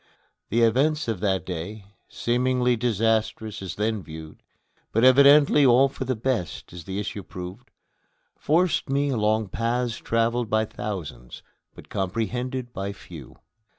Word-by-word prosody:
The 115 +3 +2
events 140 +7 +2
of 110 -5 -2
that 95 -1 0
day, 95 +4 -6 0.2
seemingly 125 +1 +1
disastrous 110 -2 0
as 95 -5 -5
then 110 0 -1
viewed, 80 -1 -10 0.5
but 115 - +1
evidently 140 +3 +7
all 130 +1 +5
for 135 0 -6
the 130 0 -1
best 110 -11 -3
as 90 -2 -9
the 95 0 -5
issue 105 0 -4
proved, 90 +6 -9 0.7
forced 165 -1 +1
me 140 +1 +1
along 110 -4 +1
paths 115 +2 -1
traveled 115 0 0
by 110 0 +2
thousands, 85 - -7 0.3
but - - -14
comprehended 120 +6 -3
by 100 -1 -4
few. 80 -9 -12
115 Hz, 135 wpm, -25 LUFS, 95-125 Hz, 0.7 s, evidently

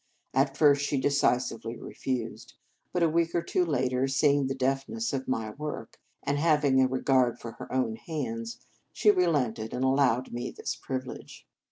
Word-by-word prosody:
At 135 +1 +2
first 145 -2 +5
she 145 -1 0
decisively 125 -4 +1
refused; 125 -1 -5 0.4
but 180 - +1
a - - +5
week 165 +1 +1
or 170 - +1
two 180 - +1
later, 130 -4 +1
seeing 140 0 +3
the 135 - -2
deftness 135 - -1
of 135 -1 -3
my 115 -4 -1
work, 150 +5 -6 0.2
and 140 +1 0
having 150 -4 +4
a 130 - +5
regard 130 -2 +2
for 115 - -7
her - - -8
own 125 -4 0
hands, 115 -8 -4 0.3
she 210 - +4
relented, 135 - 0
and 125 - -1
allowed 130 -2 +2
me 120 +1 -3
this - - -4
privilege. 130 -1 -6
135 Hz, 165 wpm, -28 LUFS, 125-145 Hz, 0.4 s, first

